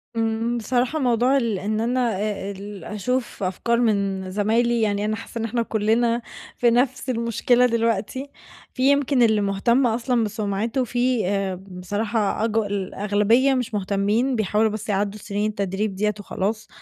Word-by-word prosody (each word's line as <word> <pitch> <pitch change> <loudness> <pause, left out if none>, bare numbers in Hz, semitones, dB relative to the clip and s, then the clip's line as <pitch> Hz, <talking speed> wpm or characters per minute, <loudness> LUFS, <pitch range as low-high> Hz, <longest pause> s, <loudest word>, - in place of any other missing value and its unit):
آمم، 225 +1 0
بصراحة 250 +5 0
موضوع 250 +1 +3
ال 230 -7 0
إن 215 +3 -1
أنا 240 -1 +1
آآ، 200 -2 -3
ال 200 -1 -9
أشوف 235 +3 -3
أفكار 235 +6 0
من 200 -5 0
زمايلي 230 +4 +1
يعني 205 -1 0
أنا 215 0 0
حاسَّة 230 - -7
إن 225 - -1
إحنا 235 +1 -1
كلنا 230 +2 +1 0.4
في 240 - +4
نفس 255 +2 +1
المشكلة 240 +1 +2
دلوقتي، 230 +3 -1 0.4
في 265 +1 +3
يمكن 280 -2 +2
اللي 220 -3 +4
مهتم 235 +6 +2
أصلًا 235 +1 +1
بسمعته 215 +4 -1
في 245 -3 0
آآ، 195 -1 -1
بصراحة 205 +4 -2
أج 225 -1 -1
الأغلبية 205 +4 +1
مش 250 -4 -2
مهتمين، 205 +6 +1
بيحاولوا 215 0 +2
بس 215 +1 -6
يعدُّوا 205 +1 -1
سنين 205 +2 -2
التدريب 200 0 -2
ديَّة 210 +2 0
وخلاص. 210 +2 -3
220 Hz, 150 wpm, -23 LUFS, 205-240 Hz, 0.4 s, في